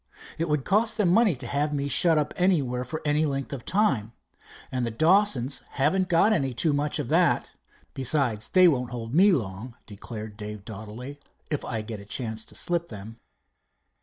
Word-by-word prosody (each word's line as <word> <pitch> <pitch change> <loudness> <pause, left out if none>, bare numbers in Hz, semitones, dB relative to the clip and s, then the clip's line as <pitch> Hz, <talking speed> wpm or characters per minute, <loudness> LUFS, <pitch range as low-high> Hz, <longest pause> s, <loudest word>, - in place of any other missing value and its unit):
It 165 0 -1
would 150 -3 0
cost 215 +2 +2
them 205 -5 +2
money 205 -1 +4
to 125 0 -9
have 145 +4 -1
me 140 0 -2
shut 165 +2 +4
up 150 - -1
anywhere 145 -10 +1
for 155 +5 -6
any 150 +1 +2
length 140 0 -4
of 130 -4 -6
time, 135 - +1 0.6
and 125 -1 -2
the 120 - -1
Dawsons 155 - +2
haven't 180 +7 +1
got 185 +5 +4
any 135 - -1
too 150 +5 +2
much 145 +1 0
of 145 -5 -3
that. - - +2 0.4
Besides, 130 -5 0
they 185 -1 +6
won't 125 -6 +1
hold 120 -1 -6
me 195 +6 +6
long," 115 - -3
declared 105 0 -8
Dave 105 -1 -8
doughtily, 110 +6 -8 0.3
"if 150 - -1
I 110 -3 -3
get 110 -1 -7
a 100 - -11
chance 110 +1 -3
to - - -12
slip 170 -1 -1
them." 110 +2 -10
140 Hz, 185 wpm, -26 LUFS, 115-165 Hz, 0.6 s, they